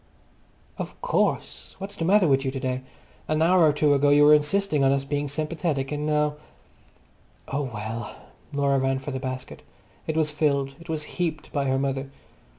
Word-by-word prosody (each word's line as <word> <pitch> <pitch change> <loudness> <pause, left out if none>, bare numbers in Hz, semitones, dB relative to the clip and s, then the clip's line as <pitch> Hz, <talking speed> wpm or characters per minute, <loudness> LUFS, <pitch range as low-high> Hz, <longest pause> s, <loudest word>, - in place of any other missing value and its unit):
"Of - - -6
course! - - -1
What's 200 +1 -7
the 165 - -2
matter 195 0 +5
with 135 -1 +3
you 135 - 0
to 135 0 -4
day? 130 -1 -2 0.5
An 155 0 0
hour 180 +2 +4
or 155 -2 +6
two 150 0 +3
ago 145 +1 +3
you 145 +1 +6
were 150 - +8
insisting 150 0 +2
on 135 - +4
us 135 0 +1
being 145 +1 -1
sympathetic, 150 -1 -2
and 150 0 -2
now—" 150 -1 +1 1.1
Oh 140 -1 -2
well! 110 0 -5 0.4
Laura 140 -1 +2
ran 135 0 +1
for 135 +2 -6
the 130 - -3
basket. 130 -1 -6 0.5
It 160 - -1
was 155 -1 +1
filled, 140 -3 0
it 170 - -14
was 155 -2 -2
heaped 160 -1 -4
by 140 -2 0
her 135 0 +1
mother. 135 0 -2
145 Hz, 185 wpm, -25 LUFS, 135-155 Hz, 1.1 s, were